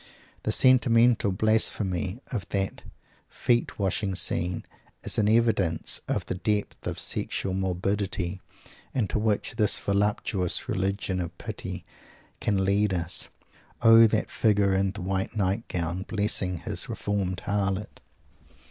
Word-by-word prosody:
The -, -, -1 dB
sentimental 120 Hz, -4 st, +5 dB
blasphemy 105 Hz, 0 st, +1 dB
of 100 Hz, -9 st, -4 dB
that 95 Hz, -1 st, -2 dB, 0.5 s
feet 120 Hz, -1 st, 0 dB
washing 95 Hz, 0 st, -1 dB
scene 90 Hz, 0 st, -1 dB, 0.4 s
is -, -, 0 dB
an 105 Hz, -1 st, +3 dB
evidence 110 Hz, -7 st, +1 dB
of -, -, -1 dB
the -, -, -3 dB
depths 105 Hz, +3 st, -2 dB
of -, -, -3 dB
sexual 95 Hz, -, -2 dB
morbidity 95 Hz, 0 st, -2 dB, 0.5 s
into 110 Hz, -5 st, 0 dB
which 105 Hz, -1 st, -1 dB
this 105 Hz, -, +4 dB
voluptuous 100 Hz, -2 st, 0 dB
religion 95 Hz, 0 st, -1 dB
of 85 Hz, -, -6 dB
pity -, -, -6 dB, 0.5 s
can 95 Hz, -2 st, 0 dB
lead 100 Hz, 0 st, +2 dB
us. 85 Hz, 0 st, -2 dB, 0.5 s
O 115 Hz, 0 st, +8 dB
that 110 Hz, 0 st, -1 dB
figure 100 Hz, -3 st, +2 dB
in 95 Hz, 0 st, +2 dB
the 100 Hz, -1 st, -6 dB
white 95 Hz, +2 st, -2 dB
nightgown, 95 Hz, -3 st, -1 dB
blessing 100 Hz, -4 st, +1 dB
his -, -, -2 dB
reformed 95 Hz, -3 st, -2 dB
harlot! 100 Hz, 0 st, -2 dB
100 Hz, 120 wpm, -27 LUFS, 95-105 Hz, 0.5 s, O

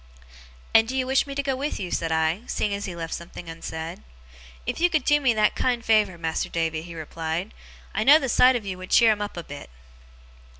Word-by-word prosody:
'And 225 Hz, 0 st, +6 dB
do 260 Hz, +2 st, -3 dB
you 260 Hz, -, +1 dB
wish 265 Hz, +2 st, +2 dB
me 275 Hz, -, -6 dB
to 280 Hz, -, -1 dB
go 270 Hz, -1 st, 0 dB
with 285 Hz, +3 st, -3 dB
you?' 180 Hz, -3 st, -5 dB
said 165 Hz, -1 st, -1 dB
I, 160 Hz, +4 st, +1 dB
seeing 210 Hz, -, -1 dB
that 200 Hz, 0 st, -3 dB
he 180 Hz, -, -6 dB
left 165 Hz, -1 st, -5 dB
something 170 Hz, 0 st, -8 dB
unsaid. 165 Hz, -, -6 dB, 0.6 s
'If -, -, -3 dB
you 350 Hz, +1 st, +4 dB
could 310 Hz, -3 st, 0 dB
do 295 Hz, 0 st, +4 dB
me 260 Hz, -3 st, +3 dB
that 215 Hz, -1 st, +3 dB
kind 245 Hz, -2 st, -1 dB
favour, 215 Hz, -5 st, +3 dB
Mas'r 160 Hz, -1 st, -2 dB
Davy,' 165 Hz, -1 st, -1 dB
he 170 Hz, 0 st, -10 dB
replied. 160 Hz, +4 st, -4 dB, 0.4 s
'I 215 Hz, +2 st, -1 dB
know 290 Hz, +3 st, +9 dB
the 275 Hz, -, -2 dB
sight 255 Hz, +1 st, +5 dB
on 230 Hz, -4 st, -3 dB
you 185 Hz, -2 st, -5 dB
would 185 Hz, -, -9 dB
cheer 230 Hz, -2 st, +6 dB
'em 210 Hz, -1 st, -1 dB
up 205 Hz, -3 st, -5 dB
a 170 Hz, -, -4 dB
bit. 145 Hz, -2 st, -10 dB
200 Hz, 230 wpm, -25 LUFS, 165-255 Hz, 0.6 s, know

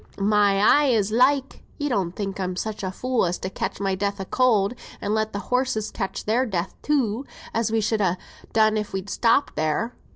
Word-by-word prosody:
"My 205 Hz, 0 st, +3 dB
eye 265 Hz, +6 st, +5 dB
as 210 Hz, -1 st, +1 dB
like! 265 Hz, +4 st, +2 dB, 0.2 s
you 290 Hz, -, -2 dB
don't 195 Hz, -10 st, -1 dB
think 195 Hz, -2 st, -4 dB
I'm 185 Hz, -1 st, -2 dB
such 215 Hz, +3 st, -4 dB
a 190 Hz, -, -2 dB
fool 255 Hz, +5 st, 0 dB
as 175 Hz, -, -2 dB
to 185 Hz, -, -5 dB
catch -, -, -4 dB
my 195 Hz, -1 st, 0 dB
death 200 Hz, +1 st, -2 dB
of 190 Hz, -, -7 dB
cold, 230 Hz, -5 st, +3 dB, 0.3 s
and 205 Hz, -, -2 dB
let 220 Hz, 0 st, 0 dB
the -, -, -4 dB, 0.2 s
horses 250 Hz, -4 st, 0 dB
catch 195 Hz, -, -4 dB
their 230 Hz, +4 st, +2 dB
death 190 Hz, -3 st, -2 dB
too, 260 Hz, -5 st, 0 dB, 0.3 s
as 230 Hz, -1 st, 0 dB
we 225 Hz, 0 st, +2 dB
should 215 Hz, 0 st, 0 dB
ha' 185 Hz, -2 st, +1 dB, 0.3 s
done 220 Hz, -1 st, +3 dB
if 210 Hz, -1 st, -4 dB
we'd 195 Hz, +1 st, -4 dB
stopped 240 Hz, +4 st, +2 dB
there. 155 Hz, +10 st, -1 dB
215 Hz, 205 wpm, -24 LUFS, 195-235 Hz, 0.3 s, eye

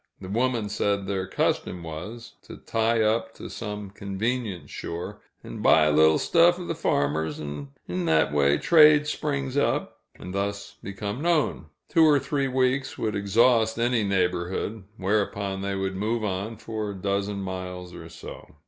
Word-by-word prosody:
The 95 Hz, -, -8 dB
woman 120 Hz, 0 st, 0 dB
said 100 Hz, -1 st, -1 dB
their 95 Hz, -1 st, -2 dB
custom 90 Hz, -1 st, -1 dB
was, 90 Hz, +10 st, -8 dB
to -, -, -10 dB
tie 115 Hz, 0 st, +1 dB
up 110 Hz, +1 st, 0 dB
to -, -, -9 dB
some 105 Hz, -3 st, -6 dB
convenient 100 Hz, 0 st, -3 dB
shore 85 Hz, +1 st, -6 dB, 0.2 s
and -, -, -8 dB
"buy 80 Hz, -, +6 dB
a 75 Hz, -, +3 dB
little 80 Hz, +1 st, +5 dB
stuff 175 Hz, +1 st, +4 dB
o' 180 Hz, -, -6 dB
the 165 Hz, -, -2 dB
farmers, 80 Hz, -, 0 dB
'n' 75 Hz, -1 st, -6 dB, 0.2 s
in 90 Hz, 0 st, -2 dB
that 80 Hz, -3 st, +2 dB
way 70 Hz, 0 st, +3 dB
trade 150 Hz, -, +6 dB
springs 140 Hz, -3 st, -2 dB
up," 145 Hz, -, 0 dB, 0.2 s
and 90 Hz, -, -9 dB
thus 100 Hz, +1 st, -3 dB
become 100 Hz, +5 st, -5 dB
known. 160 Hz, -, +1 dB, 0.2 s
Two 165 Hz, -2 st, +4 dB
or 150 Hz, -2 st, +6 dB
three 140 Hz, 0 st, -1 dB
weeks 130 Hz, +1 st, 0 dB
would 110 Hz, -1 st, -2 dB
exhaust 110 Hz, +3 st, +3 dB
any 120 Hz, -1 st, +1 dB
neighborhood, 95 Hz, +2 st, -1 dB
whereupon 100 Hz, 0 st, -1 dB
they 100 Hz, 0 st, -2 dB
would 95 Hz, 0 st, -2 dB
move 110 Hz, +4 st, -1 dB
on 105 Hz, +2 st, -3 dB
for 110 Hz, -1 st, -4 dB
a 100 Hz, -, -5 dB
dozen 100 Hz, +1 st, -2 dB
miles 90 Hz, -1 st, -6 dB
or -, -, -10 dB
so. -, -, -11 dB
100 Hz, 165 wpm, -26 LUFS, 95-120 Hz, 0.2 s, buy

